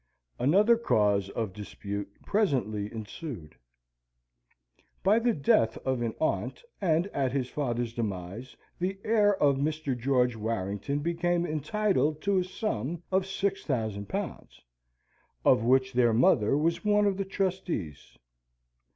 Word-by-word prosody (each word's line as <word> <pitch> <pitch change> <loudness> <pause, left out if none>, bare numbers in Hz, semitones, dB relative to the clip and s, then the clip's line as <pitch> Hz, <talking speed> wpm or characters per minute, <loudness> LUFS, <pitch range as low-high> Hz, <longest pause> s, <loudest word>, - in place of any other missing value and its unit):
Another 200 - +4
cause 105 - +2
of 110 -2 -3
dispute 100 0 -6 0.2
presently 120 - 0
ensued. 110 - -7 1.5
By 205 +5 +5
the 240 +1 +2
death 125 - +2
of 130 -2 0
an 115 -2 -2
aunt, 160 - -1 0.2
and 170 -2 +2
at 135 -3 0
his 130 -2 -1
father's 120 -5 -2
demise, 105 +1 -5 0.2
the 190 +2 -1
heir 210 -2 +3
of 140 -2 +4
Mr. 150 -1 -1
George 125 -1 +1
Warrington 110 +5 -2
became 170 +2 0
entitled 155 0 0
to 200 -1 +2
a - - +1
sum 175 - -3
of 190 0 +1
six 195 0 -1
thousand 110 -7 -2
pounds, - - -5 0.9
of - - +5
which 130 +2 +3
their 120 -2 +3
mother 115 +1 +4
was 165 +3 0
one 210 0 +3
of 200 -2 +1
the 195 - 0
trustees. 185 - -3
140 Hz, 130 wpm, -28 LUFS, 110-185 Hz, 1.5 s, By